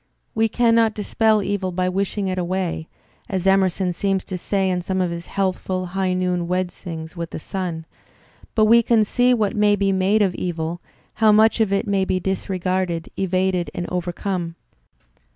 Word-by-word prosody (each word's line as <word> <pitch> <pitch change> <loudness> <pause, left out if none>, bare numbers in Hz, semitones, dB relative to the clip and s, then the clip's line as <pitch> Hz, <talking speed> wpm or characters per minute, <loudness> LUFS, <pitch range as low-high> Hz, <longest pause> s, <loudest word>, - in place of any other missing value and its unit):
We 225 0 +2
cannot 230 -1 +3
dispel 215 0 +2
evil 190 -2 -2
by 180 +1 -1
wishing 195 +2 -1
it 185 -1 -1
away, 180 -2 -2 0.4
as 190 -2 -2
Emerson 190 -1 +2
seems 195 +1 -1
to 185 - -5
say 190 +2 0
in 180 -1 0
some 190 +2 -2
of 180 -2 0
his 170 0 -6
healthful, 185 -1 -1
high 190 -1 0
noon 180 -1 -1
wedcings 175 -2 -4
with 170 -1 -5
the - - -6
sun, 170 -2 -4 0.7
but 215 - +5
we 230 +2 +6
can 225 -2 +3
see 245 +4 +2
what 215 -1 0
may 210 -1 +4
be 200 -1 +1
made 195 +3 +3
of 190 -3 +1
evil, 170 -1 -3 0.4
how 215 -1 +7
much 220 +2 +4
of 220 -3 +2
it 200 +3 +1
may 200 -2 +1
be 185 -1 0
disregarded, 185 -2 -2
evaded 185 -1 0
and 175 - -3
overcome. 175 -1 -3
190 Hz, 170 wpm, -22 LUFS, 180-205 Hz, 0.7 s, how